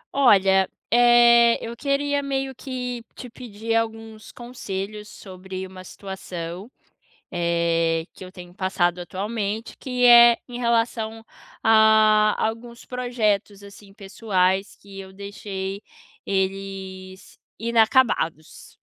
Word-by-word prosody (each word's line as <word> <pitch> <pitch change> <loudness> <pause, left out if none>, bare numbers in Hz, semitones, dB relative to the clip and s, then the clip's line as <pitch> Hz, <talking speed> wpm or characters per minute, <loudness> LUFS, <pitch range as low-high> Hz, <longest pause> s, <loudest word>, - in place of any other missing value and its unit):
Olha, 195 -7 +4 0.2
eh, 235 0 +6
eu 230 +1 -7
queria 285 +2 -1
meio 270 -1 -3
que 250 -2 -6
te 250 -2 -10
pedir 225 -2 -6
alguns 225 -1 -4
conselhos 210 -4 -7
sobre 190 -1 -9
uma 185 0 -11
situação, 185 0 -8 0.6
eh, 170 -1 0
que - - -12
eu 185 - -11
tenho 175 -2 -12
passado 180 -2 -1
atualmente, 205 +4 -4
que 250 -1 -1
é 240 -1 +8
em 245 -1 -7
relação 230 -2 -1 0.4
a 220 -1 +5
alguns 235 +2 -4
projetos, 215 -5 -2
assim, 200 0 -14
pessoais 195 -2 -1
que 200 -1 -13
eu 190 0 -10
deixei 200 0 -7 0.4
eles 190 -1 -5 0.2
inacabados. 225 - 0
210 Hz, 105 wpm, -23 LUFS, 190-235 Hz, 0.6 s, é